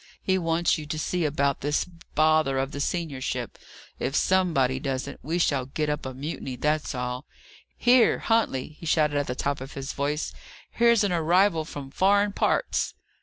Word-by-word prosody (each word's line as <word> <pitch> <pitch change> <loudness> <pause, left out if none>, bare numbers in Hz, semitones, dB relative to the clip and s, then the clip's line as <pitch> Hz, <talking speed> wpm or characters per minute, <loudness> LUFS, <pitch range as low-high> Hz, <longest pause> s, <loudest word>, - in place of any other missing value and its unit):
"He 190 0 +2
wants 165 -1 +1
you 150 - -7
to 155 - -3
see 170 +2 -1
about 140 -1 0
this 145 +1 0 0.3
bother 155 -3 +3
of 135 +1 -1
the 145 - -6
seniorship. 145 -4 -3 0.4
If 135 - -2
somebody 155 -10 +2
doesn't, 135 -2 -4
we 165 +4 -1
shall 140 -7 +1
get 150 +2 -1
up 150 -2 -3
a 130 - -6
mutiny, 135 -2 -5
that's 150 +1 -1
all. 125 +2 -4 0.5
Here, 245 -1 +5
Huntley," 220 - 0
he 165 - -7
shouted 150 -2 +2
at 145 - 0
the 125 - -3
top 140 +1 -2
of 135 - -8
his 135 0 -5
voice, 145 +2 -2 0.4
"here's 235 -2 +4
an 200 - +1
arrival 170 0 +3
from 140 -3 -8
foreign 200 +5 +3
parts!" - - 0
150 Hz, 170 wpm, -26 LUFS, 135-175 Hz, 0.5 s, Here